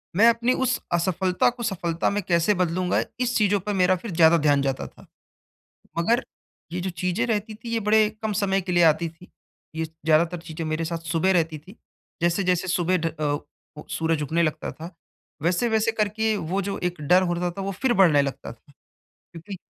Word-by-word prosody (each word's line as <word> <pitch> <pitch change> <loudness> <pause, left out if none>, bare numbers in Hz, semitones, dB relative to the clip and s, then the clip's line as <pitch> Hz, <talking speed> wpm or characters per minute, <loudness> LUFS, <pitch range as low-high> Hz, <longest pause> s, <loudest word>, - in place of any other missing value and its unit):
मैं 220 +5 +6
अपनी 235 +2 +2
उस 255 0 +1
असफ़लता 180 +3 +1
को 245 0 -7
सफ़लता 170 -6 -1
में 205 +1 -1
कैसे 170 +3 +2
बदलूँगा, 180 0 +1 0.2
इस 250 -1 0
चीज़ों 205 -2 +2
पे 205 +3 -3
मेरा 185 -1 +3
फिर 195 +4 -7
ज़्यादा 165 0 +5
ध्यान 145 -2 +4
जाता 135 -1 -2
था। - - -18 0.9
मगर 230 +8 +2 0.5
ये 180 - -2
जो 185 +1 -3
चीज़ें 180 +5 -1
रहती 215 -1 -2
थी 230 +2 -10
ये 230 - 0
बड़े 215 0 +5
कम 220 -1 -1
समय 195 -1 +1
के 180 -1 -4
लिए 175 0 +4
आती 160 +1 +3
थी, 170 +3 -17 0.4
ये 160 0 -2
ज़्यादातर 160 +2 +1
चीज़ें 165 -1 -7
मेरे 155 +1 -1
साथ 165 +1 -3
सुबह 180 +3 +2
रहती 165 -3 0
थी, 185 +9 -16 0.5
जैसे-जैसे 180 +1 +1
सुबह 180 0 +1
ढ 165 - -2
अ, - - -2 0.6
ओ - - -9
सूरज 160 -1 0
उगने 160 +4 0
लगता 155 -2 -2
था, 165 +3 -10 0.5
वैसे-वैसे 220 +6 +1
करके 220 0 0
वो 190 +2 -2
जो 200 +1 -3
एक 175 -2 -2
डर 180 +6 +4
होता 175 0 -1
था, 195 +3 -6
वो 195 +1 -3
फिर 240 +6 0
बढ़ने 155 -7 +6
लगता 135 -3 -5
था, 135 +4 -21 0.6
क्योंकि 170 +4 -9
180 Hz, 190 wpm, -24 LUFS, 165-205 Hz, 0.9 s, मैं